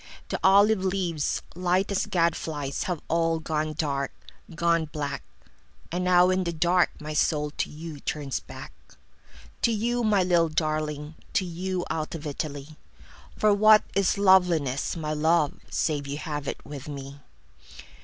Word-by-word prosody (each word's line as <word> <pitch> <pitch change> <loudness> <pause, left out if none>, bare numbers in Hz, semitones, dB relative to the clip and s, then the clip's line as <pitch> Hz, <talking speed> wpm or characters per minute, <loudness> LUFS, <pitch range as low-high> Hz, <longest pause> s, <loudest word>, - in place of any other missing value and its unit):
The - - -2
olive 200 +1 +5
leaves, 180 -5 -1
light 180 +3 0
as 195 - 0
gad 170 -2 +2
flies, 145 -3 -4
Have 175 -4 -3
all 165 0 +1
gone 155 -1 -2
dark, 140 -3 -2 0.4
gone 170 -1 +2
black. 145 -2 -4 0.7
And 180 +2 -1
now 180 0 +5
in 185 0 +1
the 170 - -2
dark 175 +2 +3
my 155 0 -6
soul 150 0 +1
to - - 0
youTurns 150 -2 -4
back. - - -11 0.9
To 235 - +3
you, 235 +3 0
my 205 -4 +3
little 170 -2 +3
darling, 155 -1 -2 0.2
To 190 - +1
you, 180 +1 -3
out 155 +1 -3
of 160 -1 -7
Italy.For 150 +8 -4
what 215 +1 +6
is 200 0 +2
loveliness, 180 -9 +3
my 155 -1 -2
love, 155 0 +2
Save 145 -4 -1
you 140 +1 -4
have 150 -2 -5
it - - -5
with 145 -1 -8
me! 140 -1 -7
165 Hz, 145 wpm, -26 LUFS, 150-185 Hz, 0.9 s, what